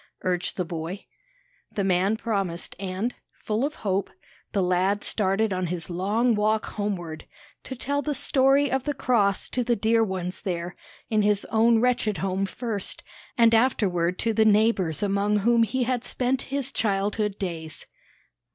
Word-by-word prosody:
urged 180 -1 -1
the 180 - -1
boy. 165 +3 -5 0.7
The 200 - -2
man 190 +3 +2
promised; 195 -7 -3
and, 195 +5 -2 0.2
full 220 +3 -2
of 300 +2 -1
hope, 195 0 0 0.4
the 195 -3 +1
lad 185 +3 +1
started 200 +1 +1
on 185 -1 -1
his 175 +1 -4
long 210 +7 +1
walk 215 +1 +1
homeward, 175 -7 -4 0.4
to 260 - -5
tell 285 +3 -2
the 295 -1 -2
story 270 +2 +3
of 265 -1 0
the 290 -1 -1
cross 205 -7 +1
to 250 - -1
the 240 0 +1
dear 225 +1 +2
ones 185 -3 -4
there, 175 -2 -3 0.4
in 215 -1 +3
his 205 -1 +2
own 225 0 +4
wretched 240 -4 +1
home 195 +1 -1
first, 215 -2 -3 0.3
and 230 -1 +5
afterward 185 -7 +2
to 230 -1 0
the 220 0 +4
neighbors 210 -6 +2
among 205 +1 +1
whom 230 +3 +3
he 250 +3 +1
had 245 -1 -1
spent 255 +1 0
his 275 -1 -1
childhood 205 -1 0
days. 165 -5 -5
210 Hz, 160 wpm, -25 LUFS, 185-235 Hz, 0.7 s, and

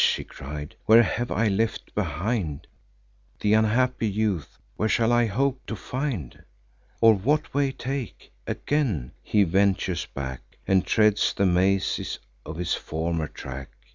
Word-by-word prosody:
he - - -5
cried, 75 +2 -8
"where 115 +2 +8
have 120 +1 -2
I 110 +2 +1
left 110 +3 -1
behind 85 -3 -2 0.7
Th' 105 - +2
unhappy 115 +2 +2
youth? 100 -6 -1 0.2
where 110 - 0
shall 115 0 +3
I 120 -1 +4
hope 130 +4 0
to 115 - -3
find? 125 - -4 0.6
Or 115 -1 +8
what 140 +10 0
way 140 -1 +2
take?" 135 -2 -5 0.2
Again 115 - -1
he 105 -1 +3
ventures 95 -1 +1
back, 65 -2 -5 0.3
And 95 -1 +3
treads 105 -1 +3
the 100 - +2
mazes 95 +2 +1 0.3
of 80 - -6
his 90 0 -1
former 80 0 -2
track. 65 0 -8
105 Hz, 140 wpm, -25 LUFS, 85-120 Hz, 0.7 s, where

